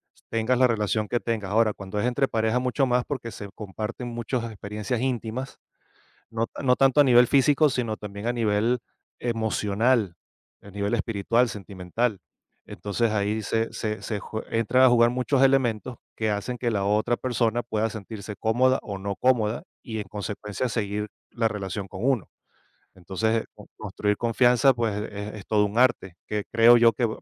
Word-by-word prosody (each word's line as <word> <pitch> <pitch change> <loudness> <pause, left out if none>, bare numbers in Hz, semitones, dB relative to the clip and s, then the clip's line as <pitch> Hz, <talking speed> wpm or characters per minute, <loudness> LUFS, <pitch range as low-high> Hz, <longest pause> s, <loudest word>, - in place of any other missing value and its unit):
s - - -27
tengas 115 +3 +1
la 130 0 +5
relación 110 -2 -1
que 120 - +1
tengas, 110 -5 -3
ahora, 110 0 +3
cuando 100 +1 -5
es 105 - 0
entre 135 +2 +1
parejas, 110 +2 +1
mucho 130 +2 +1
más, 125 -1 +1
porque 125 -5 -5
se 100 -2 -8
comparten 110 +4 -6
muchas 120 +1 -3
experiencias 105 +1 -4
íntimas, 125 0 -3 0.7
no 115 0 -1
ta - - -9
no 125 -2 +3
tanto 135 +1 +4
a - - +7
nivel 125 -2 +6
físico, 145 +3 +4
sino 120 -5 -2
también 105 +1 -6
a - - +2
nivel 115 +1 +1 0.4
emocional, 110 -2 0 0.5
el 100 - -14
nivel 100 +2 -1
espiritual, 115 +2 +1
sentimental. 100 +2 -3 0.5
Entonces 110 +3 -1
ahí 105 +1 0
se 115 +2 -1
se 110 -1 -4
se 105 - -3
ju 110 +2 -6
entran 115 +3 +2
a - - +8
jugar 120 -1 +5
muchos 130 +2 0
elementos 130 -3 +2 0.2
que 110 -1 0
hacen 105 +4 -3
que 120 -1 0
la 100 -2 0
otra 105 +4 +1
persona 120 -2 0
pueda 110 -1 -1
sentirse 105 -1 -7
cómoda 125 +5 +2
o 100 - -5
no 100 +1 -3
cómoda 120 +1 +1 0.2
y, 110 -4 -5
en 105 - -5
consecuencia, 105 +3 -4
seguir 105 -1 -2 0.2
la 115 -1 0
relación 100 -2 -3
con 95 -1 -8
uno. 130 -7 +1 0.7
Entonces 110 +5 -1
con - - -14
construir 105 0 -1
confianza, 125 +2 +4
pues 115 -3 -1 0.2
es 105 +1 -6
es 100 - -10
todo 105 -1 +3
un 105 +3 -2
arte 120 -8 +2
que 105 -1 -2
creo 115 +2 +7
yo 115 -1 +6
que 115 +2 0
115 Hz, 175 wpm, -25 LUFS, 105-120 Hz, 0.7 s, a